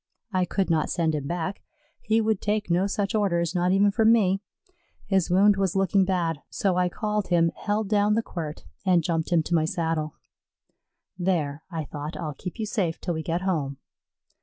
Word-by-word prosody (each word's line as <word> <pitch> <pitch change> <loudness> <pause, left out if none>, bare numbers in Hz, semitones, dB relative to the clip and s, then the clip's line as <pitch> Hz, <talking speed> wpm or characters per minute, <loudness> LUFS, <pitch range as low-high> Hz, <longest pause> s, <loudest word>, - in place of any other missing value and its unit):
I 185 -1 +2
could 190 0 -1
not 155 -2 +1
send 165 -3 +1
him 145 -2 -3
back; 175 +3 -3 0.4
he 220 +1 +2
would 220 -2 0
take 210 -3 -1
no 180 +3 +3
such 200 0 -1
orders, 170 -6 +1
not 180 0 +1
even 200 +2 +4
from 225 +2 +4
me. 195 -4 +3 0.6
His 190 -4 +1
wound 195 +3 +5
was 195 -2 0
looking 195 0 +3
bad, 170 -5 -1
so 190 -3 0
I 180 0 +2
called 210 +2 -2
him, 165 -2 +3
held 210 0 -1
down 210 0 +3
the 225 - +1
quirt, 160 -6 -6 0.2
and 180 -3 +3
jumped 165 -1 -1
him 165 -2 +4
to 175 - -4
my 160 -2 +3
saddle. 160 -2 -2 1.0
"There," 160 -5 0
I 165 -4 -4
thought, 150 +2 -6
"I'll 155 -1 -4
keep 180 - -7
you 220 - -2
safe 185 -6 -1
till 175 - -2
we 160 - -3
get 165 +2 -2
home." 150 -8 -1
180 Hz, 190 wpm, -26 LUFS, 165-200 Hz, 1.0 s, wound